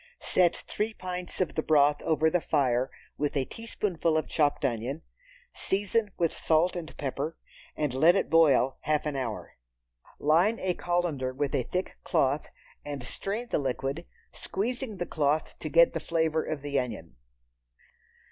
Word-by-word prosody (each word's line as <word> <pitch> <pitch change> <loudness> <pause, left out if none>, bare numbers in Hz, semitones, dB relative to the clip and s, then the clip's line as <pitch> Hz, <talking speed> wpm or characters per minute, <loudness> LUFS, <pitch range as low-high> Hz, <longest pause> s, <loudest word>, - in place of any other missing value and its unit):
Set 175 -2 +3
three 215 +1 -3
pints 180 -1 -5
of 180 - 0
the 155 - 0
broth 145 -1 +4
over 160 0 +2
the 175 +2 +2
fire 130 -4 +1 0.3
with 145 0 0
a 135 - +1
teaspoonful 180 - -1
of 155 - -1
chopped 145 -2 +1
onion, 130 +5 -2 0.5
season 205 +2 0
with 170 -2 +1
salt 165 +3 +2
and 170 -3 -7
pepper, 145 +3 -3 0.4
and 150 -4 0
let 160 +7 +5
it - - +1
boil 145 -5 +4
half 150 0 0
an 150 -2 -2
hour. 125 -5 -4 0.6
Line 170 +10 +3
a 185 -1 0
colander 175 -8 -1
with 140 +2 -2
a - - +2
thick 185 +1 -3
cloth, 145 -3 +1 0.4
and 145 -3 -5
strain 205 - -4
the - - +1
liquid, 135 +4 -3 0.2
squeezing 235 +1 -3
the 175 - -2
cloth 150 -1 0
to - - -4
get - - +5
the - - -1
flavor 160 -1 0
of 150 -3 -4
the 140 -1 0
onion. 105 - -5
155 Hz, 155 wpm, -28 LUFS, 140-180 Hz, 0.6 s, let